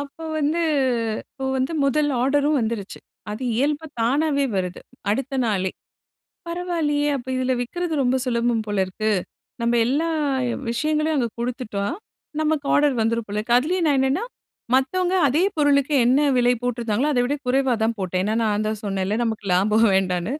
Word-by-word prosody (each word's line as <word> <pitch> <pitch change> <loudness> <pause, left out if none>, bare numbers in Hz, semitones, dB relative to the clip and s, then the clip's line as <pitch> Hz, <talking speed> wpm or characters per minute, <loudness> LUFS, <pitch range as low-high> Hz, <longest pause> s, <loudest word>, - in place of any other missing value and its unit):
அப்ப 285 +2 -8 0.2
வந்து 305 +3 +1 0.7
அப்ப 265 -1 -6
வந்து 260 +5 -1
முதல் 290 +1 +2
ஆர்டரும் 290 +2 +2
வந்துருச்சு, 220 -3 -3 0.3
அது 215 +5 -5
இயல்பு 295 +4 0
தானாவே 280 +4 +2
வருது 180 -1 -3 0.3
அடுத்த 270 +4 -2
நாளே. 190 -3 0 0.8
பரவாயில்லையே, 335 -4 -1
அப்போ 260 -1 -8
இதில 255 0 0
விற்கிறது 340 +7 -3
ரொம்ப 255 0 +2
சுலபம் 235 -2 0
போல 205 -1 -2
இருக்கு. 215 +4 -2 0.5
நம்ம 235 +1 +2
எல்லா 295 +7 +1 0.6
விஷயங்களையும் 305 +5 0
அங்க 235 -2 +1
குடுத்துட்டா 235 -4 -3 0.6
நமக்கு 305 -2 0
ஆர்டர் 290 -3 +3
வந்துரும் 230 0 0
போல 205 +1 -3
இருக்கு, 235 +3 +2
அதுலேயே 345 +7 -1
நான் 285 -3 +3
என்னன்னா 270 - +1 0.5
மத்தவங்க 360 +8 +1
அதே 300 +7 +2
பொருளுக்கு 290 -1 +3
என்ன 260 +4 +4 0.2
விலை 245 0 +4
போட்டிருந்தாங்களோ, 240 +3 0
அதவிட 245 +3 +1
குறைவா 260 0 +2
தான் 225 0 +1
போட்டேன். 185 -1 -1
ஏனா, 215 +1 0
நான் 210 -1 0
தான் 215 -1 -2
சொன்னேன்ல 195 +1 -1
நமக்கு 220 -2 -3
லாபம் 215 +4 +3
வேண்டான்னு. 185 +3 0
255 Hz, 150 wpm, -23 LUFS, 220-290 Hz, 0.8 s, என்ன